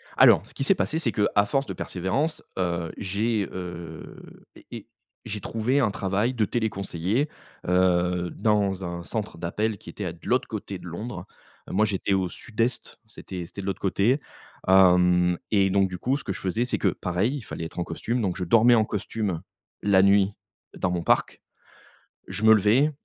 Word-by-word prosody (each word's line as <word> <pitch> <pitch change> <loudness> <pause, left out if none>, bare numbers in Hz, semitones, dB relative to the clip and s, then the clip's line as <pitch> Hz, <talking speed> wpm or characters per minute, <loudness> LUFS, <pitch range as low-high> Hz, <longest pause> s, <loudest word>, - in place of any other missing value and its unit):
Alors, - - +7
ce - - -14
qui - - -3
s'est 195 - +4
passé 160 - -1
c'est 125 -8 0
qu'à 105 -1 +2
force 135 +6 0
de - - -5
persévérance, 125 - -2
heu, 85 -3 -1
j'ai, 105 +1 -1
heu, 85 -3 -7 0.4
et - - -15
et 115 -2 -8 0.4
j'ai 105 -2 -5
trouvé 115 +7 0
un 115 -5 +2
travail 100 +5 0
de 115 -4 +1
téléconseiller, 105 - -1 0.4
heu, 90 -1 +2
dans 100 -3 +1
un 85 0 -5
centre 105 0 -4
d'appel 105 +6 -2
qui - - -13
était 90 -5 -5
de 85 - -18
l'autre 125 +1 +2
côté 100 -3 -5
de - - -12
Londres. 105 +8 -6 0.4
Moi, 105 - +2
j'étais 100 -1 -1
au 95 -2 +1
sud-est, 115 +5 -3
c'était 95 -5 -7
c'était 85 - -11
de - - -7
l'autre 95 -2 -3
côté, 105 +8 +2 0.5
hem 90 -2 +5
et 100 -2 +4
donc 95 0 +2
du 90 - -5
coup, 130 +9 0
ce 145 - -5
que - - -3
je 95 - -5
faisais, 95 +5 -1
c'est 125 - -1
que, - - +1
pareil, 90 +9 -1
il 145 - -5
fallait 85 -6 -6
être 85 - -7
en - - +1
costume, 115 +9 -2
donc 95 -4 -1
je 90 - -2
dormais 115 +6 +6
en 110 -2 +3
costume 105 -4 -3 0.4
la 100 -2 +4
nuit 100 0 +4 0.5
dans 95 - 0
mon 85 -1 -2
parc, - - +1 0.9
je 105 - -5
me 110 0 +8
levais, 110 +9 +4
100 Hz, 185 wpm, -25 LUFS, 90-115 Hz, 0.9 s, me